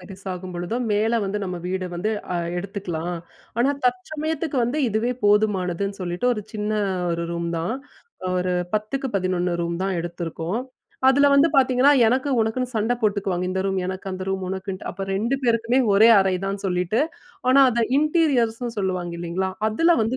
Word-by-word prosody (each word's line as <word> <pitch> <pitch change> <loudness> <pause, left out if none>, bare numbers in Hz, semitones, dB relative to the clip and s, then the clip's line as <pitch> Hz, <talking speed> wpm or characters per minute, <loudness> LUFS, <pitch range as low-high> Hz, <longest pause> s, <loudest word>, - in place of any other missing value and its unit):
பெருசாகும்பொழுதோ, 185 +1 -5 0.2
மேல 220 +3 +2
வந்து, 200 +2 -2
நம்ம 180 -1 -4
வீடு 185 0 -2
வந்து 210 +5 -1 0.2
அ, - - +1 0.2
எடுத்துக்கலாம். 175 -3 -4 0.4
ஆனா, 270 +4 +3
தற்சமயத்துக்கு 300 +4 -2
வந்து, 285 +6 -1
இதுவே 225 +3 0
போதுமானதுன்னு 200 -2 +1
சொல்லிட்டு, 180 +6 -2
ஒரு 210 - -5
சின்ன 210 0 -2 0.4
1 170 0 -1
ரூம் 170 0 -2
தான். 175 +9 -2 0.6
ஒரு 180 0 0 0.2
10 215 +6 -1
11 180 -1 0
ரூம் 170 0 -2
தான் 195 -2 -1
எடுத்துருக்கோம். 170 +4 -4 0.5
அதில 280 +2 +5
வந்து 280 +4 +6
பாத்திங்கன்னா, 260 +1 +5
எனக்கு 260 +4 +1
உனக்குன்னு 245 +3 -1
சண்ட 220 +3 +1
போட்டுக்குவாங்க. 195 -4 0
இந்த 190 0 -1
ரூம் 190 -1 0
எனக்கு, 190 +1 -6
அந்த 185 0 -5
ரூம் 190 -1 -2
உனக்குன்ட்டு. 190 0 -5
அப்ப 195 +2 -5
2 230 +7 0
பேருக்குமே, 230 +2 +2 0.2
ஒரே 220 +3 +7
அறை 190 -1 +2
தான்னு 195 0 -4
சொல்லிட்டு, 180 +6 0 0.5
ஆனா 265 +2 +6
அதை 235 0 +1 0.2
இன்டீரியர்ஸ்னு 255 -7 +1
சொல்லுவாங்க, 185 -3 -2
இல்லைங்களா? 175 +2 -2 0.2
அதில 330 +10 +3
வந்து, 235 +4 -1
200 Hz, 155 wpm, -23 LUFS, 185-240 Hz, 0.6 s, ஒரே